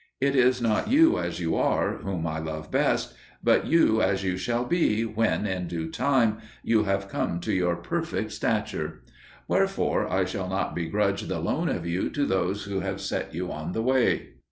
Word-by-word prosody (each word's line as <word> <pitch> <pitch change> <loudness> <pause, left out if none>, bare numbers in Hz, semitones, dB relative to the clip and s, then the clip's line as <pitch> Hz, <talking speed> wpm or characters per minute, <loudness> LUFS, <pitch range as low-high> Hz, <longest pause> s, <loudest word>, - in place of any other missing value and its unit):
It 140 +1 +1
is 125 -1 +3
not 110 -2 +1
you 325 +6 +5
as - - -3
you 80 -2 0
are - - +1
whom 90 -4 -4
I 80 -1 -2
love 80 -1 -6
best, - - +1 0.3
but - - +3
you 110 -9 +4
as 95 0 +1
you 90 -1 0
shall 120 +6 -1
be 120 -8 +2
when, 110 -1 0
in 95 -3 -2
due 80 -1 -4
time, 120 -4 +2 0.2
you 110 -2 +2
have 100 0 0
come 85 -3 -2
to - - -2
your 90 -2 +1
perfect 85 0 -3
stature; - - -2 0.4
wherefore - - +1
I 95 0 +2
shall 95 0 -4
not 95 +1 -1
begrudge 100 +4 -1
the - - -2
loan - - -1
of - - -2
you 85 +2 -1
to 145 - 0
those 95 0 0
who 100 -1 -3
have 95 +1 -3
set - - -3
you 90 +1 -3
on 80 +3 -5
the 110 - -1
way. 130 0 +2
100 Hz, 190 wpm, -26 LUFS, 90-115 Hz, 0.4 s, you